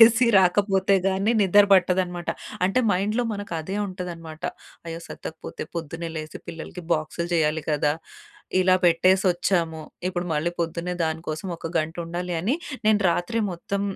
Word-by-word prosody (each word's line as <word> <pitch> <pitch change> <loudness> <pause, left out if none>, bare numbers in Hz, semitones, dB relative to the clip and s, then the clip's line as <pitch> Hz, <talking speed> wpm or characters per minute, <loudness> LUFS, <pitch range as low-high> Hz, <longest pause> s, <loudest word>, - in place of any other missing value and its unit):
చేసి 235 +2 +8
రాకపోతే 195 +1 +3
గానీ 195 +4 +1
నిద్ర 200 +2 +6
పట్టదనమాట. 180 -2 +2 0.4
అంటే 195 +7 +2
మైండ్‌లో 210 +6 +1
మనకదే 195 -2 -4
ఉంటదనమాట. 170 -4 -7 0.4
అయ్యో! 165 0 -5
సద్దకపోతే 160 -1 -7
పొద్దున్నే 165 +1 -4
లేసి 155 0 -7
పిల్లలకి 165 +2 -7
బాక్సులు 160 +2 -3
జేయాలి 155 -1 +2
కదా! 150 0 +2 0.7
ఇలా 185 0 +5
పెట్టేసొచ్చాము, 175 -1 +3 0.3
ఇప్పుడు 175 -1 -3
మళ్ళీ 155 +3 0
పొద్దున్నే 170 +2 -2
దానికోసం 160 +2 -3
ఒక 165 - -7
గంటుండాలి 170 +3 -3
అని 220 +10 +1 0.3
నేను 215 -1 +5
రాత్రి 175 +7 -1
మొత్తం 195 +3 -3
175 Hz, 125 wpm, -25 LUFS, 165-190 Hz, 0.7 s, చేసి